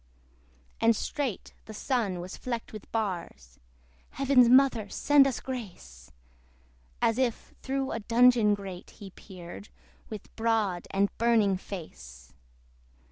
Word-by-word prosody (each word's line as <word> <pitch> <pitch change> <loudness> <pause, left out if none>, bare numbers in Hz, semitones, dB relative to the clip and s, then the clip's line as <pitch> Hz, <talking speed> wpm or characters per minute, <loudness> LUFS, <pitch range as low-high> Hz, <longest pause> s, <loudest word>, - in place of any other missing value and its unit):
And 230 0 +4
straight 265 -3 -4
the 220 - -10
Sun 205 -8 -1
was 180 +1 -7
flecked 235 -3 -5
with 215 - -10
bars, 170 - -4 0.5
(Heaven's 265 -3 +4
Mother 250 -5 +4
send 285 +3 +4
us 265 - -2
grace!) 175 - -8 0.9
As 225 +2 +2
if 245 -3 -2
through 270 0 -2
a 225 - -3
dungeon 230 -1 +4
grate 190 -3 -9
he 195 -2 -10
peered, 185 +1 -11 0.4
With 215 -3 -9
broad 220 -6 0
and 200 +1 0
burning 225 -4 +3
face. 65 - -10
215 Hz, 120 wpm, -28 LUFS, 185-245 Hz, 0.9 s, And